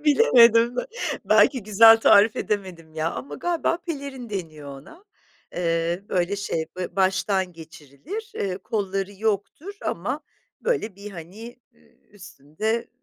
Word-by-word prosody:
Bilemedim 240 - +5 0.5
belki 255 -6 +4
güzel 225 +2 +7
tarif 210 0 +5
edemedim 180 -6 -4
ya 160 +1 -1
ama 275 - -7
galiba 345 -1 -1
pelerin 280 -8 -7
deniyor 155 -7 -6
ona, 335 - -17 0.5
eee, 170 +1 -1
böyle 185 +2 0
şey 165 -5 -3
böyle 180 -1 -4
ba - - -27
baştan 190 -1 +1
geçirilir, 165 - -10
eee, 190 -1 -3
kolları 195 -2 -3
yoktur 215 - -3
ama - - -3 0.4
böyle 415 - -1
bir 205 +1 -9
hani, 200 +8 -10 0.2
ııı, - - -27 0.3
üstünde, 195 +4 -4
200 Hz, 125 wpm, -24 LUFS, 175-235 Hz, 0.5 s, güzel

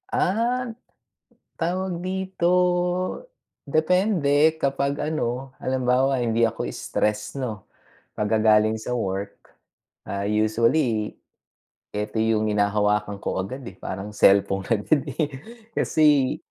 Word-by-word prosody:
Ah, 235 +4 0 0.9
tawag 180 +1 -1
dito, 190 -1 -2 1.2
depende 160 -1 +3
kapag 140 +1 0
ano, 135 -4 -2
halimbawa 130 0 +1
hindi 115 0 +2
ako 115 - -3
stress 105 0 -2
'no, 115 -8 -5 0.5
pagka 110 +1 0
galing 110 0 +4
sa 115 +3 -4
work. 100 -4 -3 0.7
Ah, 100 0 -3
usually 110 +2 +1 0.8
eto 105 +2 -3
yung 110 -1 +1
hinahawakan 105 0 +1
ko 95 - -1
agad 130 +8 -7
eh, 95 - -8
parang 95 +2 -6
selpon 95 -1 +4
agad 115 +6 +1
eh. 145 +3 -1 0.5
Kasi, 145 -4 +3
120 Hz, 100 wpm, -24 LUFS, 105-150 Hz, 1.2 s, galing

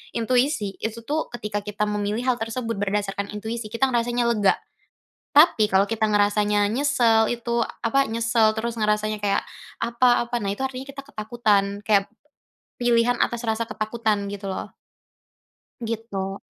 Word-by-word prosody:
intuisi 245 -3 +1
itu, 225 +1 -4
tuh, 310 +2 -1
ketika 210 -3 -3
kita 210 +1 -1
memilih 210 +2 -1
hal 250 -2 +2
tersebut 225 0 -3
berdasarkan 200 0 -2
intuisi 220 +2 -4
kita 260 +3 +1
ngerasanya 240 0 +1
lega, 210 -4 +3 0.8
tapi 290 -8 +6
kalau 190 +1 +4
kita 220 -1 +1
ngerasanya 205 0 +3
nyesel 235 -4 +3
itu, 235 0 -1 0.2
apa, 275 +4 +3
nyesel 230 -1 +2
terus 235 +1 -3
ngerasanya 215 0 0
kayak 200 -1 +1 0.4
apa 240 +1 +3
apa, 240 - -1
nah 195 - -1
itu 265 - -6
artinya 265 +1 -7
kita 275 0 -8
ketakutan, 210 -5 0
kep 200 -2 +4 0.7
pilihan 240 0 +3
atas 235 0 -1
rasa 225 +1 0
ketakutan 215 -2 -1
gitu 200 -1 -6
loh. 190 - -5 1.1
Gitu. 205 -4 -4
225 Hz, 140 wpm, -24 LUFS, 205-240 Hz, 1.1 s, tapi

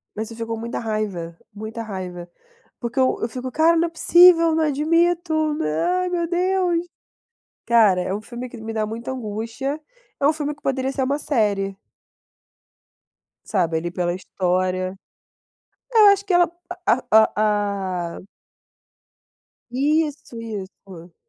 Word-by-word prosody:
Mas 220 +1 -4
eu 230 - -10
fico 230 0 -4
com 225 - -4
muita 235 +1 -4
raiva. 205 -7 -3 0.2
Muita 220 +2 -6
raiva. 185 -5 -6 0.5
Porque 235 +1 -4
eu 260 -1 +3
eu 225 - 0
fico: 255 +2 -5
"Cara, 325 +4 +4
não 335 +1 +3
é - - -13
possível! 335 0 +6
Não 320 0 +2
admito! 315 +1 +1
Nã 155 - -1 0.2
ai, 365 - -1
meu 345 -2 -1
Deus!" 360 -1 +1 0.8
Cara, 215 -6 +4
é 185 - -2
um 205 - -3
filme 245 +3 -7
que 240 - -10
me 225 0 -6
dá 215 -1 0
muita 230 +4 -5
angústia. 240 +4 -4 0.4
É 280 - +3
um 305 - +4
filme 295 -1 -3
que 295 - -27
poderia 265 0 -1
ser 270 -1 -1
uma 280 +3 0
série. 205 -9 0 1.7
Sabe, 170 -5 0
ali 170 +2 -3
pela 175 -1 -1
história. 185 0 -1 0.9
É, 465 - +1
eu 425 - +9
acho 400 0 +4
que 390 - -1
ela 350 -1 +5 0.4
a - - +6 0.2
a 220 0 +6
a 200 -5 -1
a - - -12 1.5
Isso, 290 -1 -1
isso. 190 -5 -9
230 Hz, 150 wpm, -22 LUFS, 195-310 Hz, 1.7 s, eu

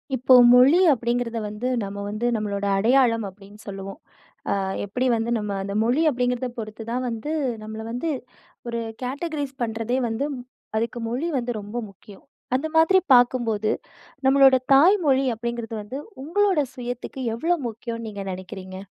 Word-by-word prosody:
இப்போ 255 +1 +3 0.2
மொழி 260 +8 +7
அப்படிங்கிறத 235 -1 -2
வந்து 210 +4 -4 0.2
நம்ம 200 0 -6
வந்து 215 +3 -3
நம்மளோட 205 -2 -2
அடையாளம் 230 +1 +3
அப்படின்னு 200 +2 -16
சொல்லுவோம். 195 +4 -7 0.5
அ - - +3 0.3
எப்படி 250 +6 -2
வந்து 225 +1 -2
நம்ம 210 -1 -3
அந்த 200 0 -4
மொழி 245 +7 +2
அப்படிங்கிறத 250 -1 -1
பொறுத்துதான் 230 +3 -4
வந்து 230 +6 -4 0.3
நம்மள 220 +1 -7
வந்து 250 +8 -2 0.6
1 235 0 -2 0.2
கேட்டகரீஸ் 285 +1 -3
பண்ணுறதே 225 +2 -1
வந்து 225 +5 -2 0.5
அதுக்கு 230 +2 -2
மொழி 255 +8 -2
வந்து 245 -1 -2
ரொம்ப 205 +4 -7
முக்கியம். 195 +1 -16 0.3
அந்த 280 +5 -1
மாதிரி 325 +4 +6
பார்க்கும்போது, 240 -4 +3 0.6
நம்மளோட 270 0 +6 0.2
தாய் 340 +10 +7
மொழி 270 -1 +3
அப்படிங்கிறது 235 0 -4
வந்து 215 +6 -7 0.3
உங்களோட 385 +3 +2 0.2
சுயத்துக்கு, 245 +1 -6 0.2
எவ்வளோ 335 +9 +1
முக்கியம்னு 230 0 -6
நீங்க 200 -2 -6
நினைக்கிறீங்க? 185 0 -8
235 Hz, 140 wpm, -24 LUFS, 215-260 Hz, 0.6 s, மொழி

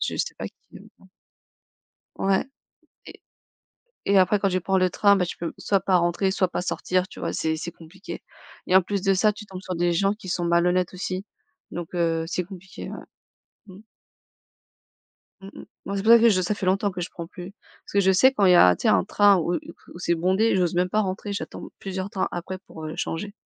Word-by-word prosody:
je - - -1
sais - - -2
pas - - -5
qui - - -26 0.2
aime - - -14
ça. - - -22 1.1
Ouais. 195 0 +2 0.6
Et - - -13 0.9
et 200 0 +4
après 190 +3 +4
quand 195 - +1
tu 185 -1 0
prends 190 +2 +1
le 185 0 +3
train, 200 +3 +4
bah, 180 -2 +1
tu - - -6
peux 170 - -4
soit 195 -1 +1
pas 185 -1 +2
rentrer, 175 +3 +1
soit 190 -1 +1
pas 180 - -3
sortir, 185 0 -1
tu - - -12
vois, - - -2
c'est 160 0 -1
c'est 170 +2 -6
compliqué 175 +5 -10 0.4
et 185 - 0
en 190 - +6
plus 195 +1 -3
de 195 -1 +3
ça, 210 +3 +3
tu 210 +1 -11
tombes 185 -2 -8
sur 185 - -4
des 175 0 +1
gens 195 +4 +2
qui 200 -3 -12
sont 175 0 -1
malhonnêtes 175 +2 +2
aussi, 185 +1 -4 0.5
donc 175 0 -7
heu, 165 -2 0
c'est 180 +2 -2
compliqué, 185 0 -10
ouais. - - -6 0.7
Mmh. 190 +2 -13 1.6
Mmh 195 - -10
mh. - - -9 0.2
Moi 200 - -3
c'est 195 - -2
pour 225 - +5
ça 235 - +9
que 235 - +5
je 185 -4 +2
ça 180 +4 0
fait 200 - -5
longtemps 195 +2 +1
que 180 - -7
je 175 - -4
prends 170 - -7
plus. 180 +2 -9 0.3
Parce - - -13
que 200 - +4
je 190 0 +4
sais 260 +8 +5
quand 205 -6 +2
il 185 - +6
y - - +7
a 130 - +8
un 90 - +3
tu - - -11
sais, - - +2
un 95 -3 +4
train 205 -1 +5
où 175 0 -1
où - - +1 0.4
où - - -10
c'est 170 -1 +1
bondé, 190 +7 +2
j'ose 180 -2 +1
même 180 +1 +1
pas 215 +3 +2
rentrer, 195 +1 -4
j'attends 200 - -6
plusieurs 190 0 -4
trains 195 - -1
après 175 +2 -5
pour, 160 - -9
heu, 155 - -5
changer. 200 +5 -3
185 Hz, 240 wpm, -24 LUFS, 175-195 Hz, 1.6 s, ça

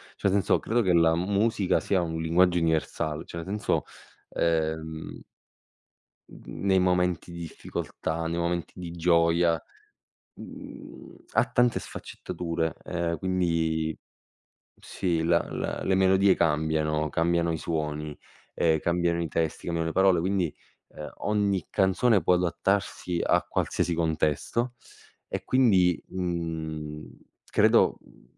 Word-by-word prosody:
Cioè 100 - 0
senso 100 -1 +2
credo 120 +2 +1
che 95 -5 +2
la 85 -1 +4
musica 100 +2 +1
sia 95 -3 +1
un 80 -1 -3
linguaggio 90 +2 +3
universal 80 -1 -1
cioè 85 - -9
nel 85 - -5
senso, 105 +2 -1 0.5
ehm 80 -1 -2 1.1
mhmm, - - -9
nei 95 -1 +4
momenti 90 -2 +1
di 85 - -8
difficoltà, 80 0 -4
nei 85 +1 -2
momenti 85 0 -2
di 85 -2 -6
gioia, 85 -1 +2 0.7
mhmm - - -10 0.4
ha - - +4
tante 120 -1 +2
sfaccettature, 85 -2 -4
ehm, 85 -1 -2
quindi 85 -4 0 0.8
sì, 85 -4 -2
la 85 +1 +4
la - - -3
le 95 - +2
melodie 95 0 +4
cambiano, 75 -1 +1
cambiano 85 +2 +1
i 80 - -1
suoni, 75 -2 -3 0.4
ehm, 80 -1 +2
cambiano 85 +1 0
i 85 - -2
testi, 80 0 -2
cambiano 85 -1 -1
le - - -6
parole. 95 -2 +4
Quindi, 90 -2 0 0.4
ehm, 75 -2 -9
ogni 100 -4 0
canzone 100 +3 +3
può - - +3
adattarsi 90 0 -1
a - - +3
qualsiasi 85 - -1
contesto, 80 - 0 0.5
e - - -4
quindi, 95 -9 +3
mhmm, 80 -4 -4 0.4
credo, - - +4
mhmm, - - -21
85 Hz, 125 wpm, -27 LUFS, 80-95 Hz, 1.1 s, la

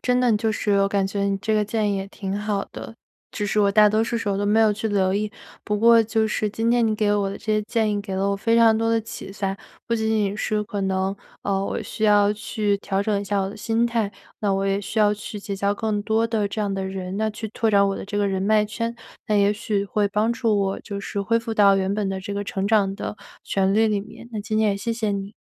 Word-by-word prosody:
真 250 0 +1
的 245 -3 +3
就 225 +1 0
是 205 -1 +1
我 195 - +3
感 200 -1 +1
觉 200 0 -2
你 200 0 +1
这 220 +3 -1
个 215 - +3
建 210 -1 0
议 - - -1
也 195 0 -4
挺 195 0 -4
好 205 -1 -1
的。 225 - -8 0.4
只 210 - -3
是 210 - 0
我 200 -1 +4
大 210 +1 +6
多 215 +1 +2
数 230 +1 -1
时 225 -2 -3
候 195 -1 0
都 205 - 0
没 215 +2 +4
有 215 -1 +5
去 220 +2 -3
留 190 -2 +1
意， 210 +1 -1 0.3
不 210 - 0
过 230 +2 +6
就 220 0 +1
是 215 0 -1
今 225 +3 -1
天 240 -1 +3
你 215 - +1
给 210 -1 +1
我 205 -1 +1
的 195 - -5
这 - - -16
些 215 0 +2
建 220 0 0
议 205 -1 -1
给 200 -2 -5
了 195 +1 0
我 200 - 0
非 230 +3 +1
常 225 -1 +6
多 225 0 0
的 230 0 +2
启发。 195 -3 -5 0.3
不 230 - +2
仅 220 -1 0
仅 210 -2 +1
是 215 0 -1
可 205 -1 -4
能， 190 0 0 0.3
呃， 195 -1 0
我 - - -3
需 220 - -3
要 205 -1 +5
去 210 -1 -1
调 195 0 -1
整 205 -1 0
一 - - -5
下 200 0 0
我 190 0 -2
的 205 - -10
心 225 +2 0
态， 230 -4 0 0.3
那 205 -2 0
我 195 0 0
也 195 0 +1
需 215 +2 -2
要 210 -1 +5
去 210 0 -6
结 200 0 -4
交 200 +1 0
更 215 -1 -1
多 220 +1 +2
的 220 -3 0
这 215 +2 -4
样 200 -1 -1
的 195 0 -2
人 190 0 -5
那 220 +1 0
去 215 +1 -6
拓 225 +1 -1
展 200 -1 +4
我 195 - -2
的 - - -6
这 205 +1 -5
个 205 0 +2
人 190 -1 -1
脉 210 +2 +3
圈， 230 +2 -3 0.3
那 215 - 0
也 200 0 +4
许 210 -2 -2
会 205 +1 0
帮 215 +3 +1
助 230 -3 +1
我 195 -1 0
就 200 -2 -6
是 200 0 -4
恢 230 +3 +1
复 230 0 -5
到 200 -2 +5
原 190 0 0
本 205 -1 -1
的 190 0 -3
这 200 +1 -6
个 205 0 -3
成 195 0 -3
长 200 -3 +3
的 210 - -5 0.3
旋 195 0 +1
律 220 +1 +4
里 210 -2 0
面。 215 +3 -12
那 215 - -3
今 215 +1 -3
天 215 -1 +3
也 195 - -1
谢 230 +4 -2
谢 220 -2 -1
你。 200 +1 -4
210 Hz, 305 characters per minute, -23 LUFS, 200-220 Hz, 0.4 s, 大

